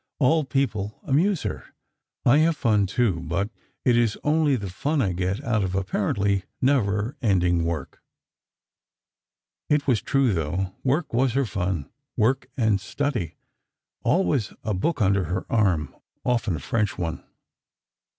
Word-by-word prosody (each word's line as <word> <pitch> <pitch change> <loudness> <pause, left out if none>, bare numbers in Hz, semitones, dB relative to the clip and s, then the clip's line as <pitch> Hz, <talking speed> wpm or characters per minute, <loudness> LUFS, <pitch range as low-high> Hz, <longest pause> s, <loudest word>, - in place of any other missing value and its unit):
All 155 +2 +3
people 110 -7 -1
amuse 165 +6 +2
her.... - - -4 0.6
I 135 +5 +6
have 160 0 +3
fun, 105 -6 +2
too, 100 -3 +1
but 90 +6 -2 0.3
it 125 - +5
is 115 -3 +2
only 150 -2 +3
the 100 -5 -4
fun 145 - -1
I 105 -8 +1
get 95 +8 -2
out 115 -6 +1
of 95 0 -2
apparently 100 +1 0
never 120 -1 +1
ending 90 -6 +2
work." 85 -2 -4 1.7
It 150 -1 +2
was 125 -6 +2
true, 135 -5 +2
though: 90 +3 -2
Work 145 +3 0
was 125 0 +2
her 135 +1 +2
"fun"—work 105 - -2
and 110 -5 +2
study—always 140 - -2
a 105 - -1
book 115 - 0
under 100 -1 +2
her 90 +3 -3
arm: 95 -9 +1 0.3
often 115 -7 +1
a - - -4
French 105 +1 -1
one. 85 -2 -3
110 Hz, 135 wpm, -25 LUFS, 95-135 Hz, 1.7 s, I